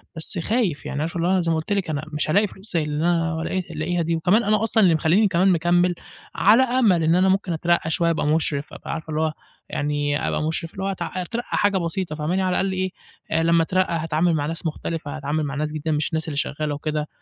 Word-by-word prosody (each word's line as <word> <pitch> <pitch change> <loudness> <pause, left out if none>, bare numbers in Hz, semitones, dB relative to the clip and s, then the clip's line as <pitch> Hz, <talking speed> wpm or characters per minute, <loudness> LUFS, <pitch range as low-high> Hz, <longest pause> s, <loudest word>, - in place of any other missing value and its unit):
بس 160 +1 +1
خايف، 205 - -1
يعني 145 - -3
عارفة 165 +2 -3
اللي 170 +1 0
هو - - +2
أنا 190 - +3
زي 165 -1 0
ما 160 - +1
قُلت 160 +6 -2
لكِ 195 -5 -1
أنا 150 -1 -2
مش 150 - -1
هالاقي 205 +6 +3
فلوس 190 +1 -13
زي 165 - +2
اللي 150 +1 -2
أنا 165 -2 +1
لاق 185 +2 -2
لاقيها 165 +3 -1
دي، 165 +1 0
وكمان 180 +8 +3
أنا 215 0 +2
أصلًا 225 -1 +3
اللي 175 -4 +5
مخلّيني 175 +7 +3
كمان 185 +1 +2
مكمّل 175 +1 +2 0.4
على 225 +6 +5
أمل 235 -10 +3
إن 160 +2 +3
أنا 185 +1 +4
ممكن 190 -2 +1
أترقّى 170 0 +1
شوية، 170 +1 +1
أبقى 165 - -1
مُشرِف، 150 -2 0
أبقى - - -7
عارفة 160 -1 -6
اللي 155 0 -1
هو 160 -1 0 0.4
يعني 145 0 -1
أبقى - - -1
مُشرِف، 160 +1 -2
اللي 190 - -5
هو 195 - -1
أت 195 - -2
أترقّى 185 +7 -3
حاجة 205 -1 +2
بسيطة 170 -2 -2
فاهماني، 165 +5 -1
على 185 - +1
الأقل 195 0 0
إيه، 185 0 -1 0.5
لمّا 165 0 +3
أترقّى 185 +1 0
هاتعامل 165 +1 +1
مع 145 -1 -1
ناس 165 +2 -5
مختلفة 155 -1 -4
هاتعامل 150 +2 -2
مع 140 -1 -3
ناس 150 +1 -1
جديدة 155 +1 -3
مش 150 0 0
الناس 160 0 -2
اللي 145 -3 -4
شغالة 150 0 -1
وكده، 150 0 -3
165 Hz, 240 wpm, -23 LUFS, 155-185 Hz, 0.5 s, اللي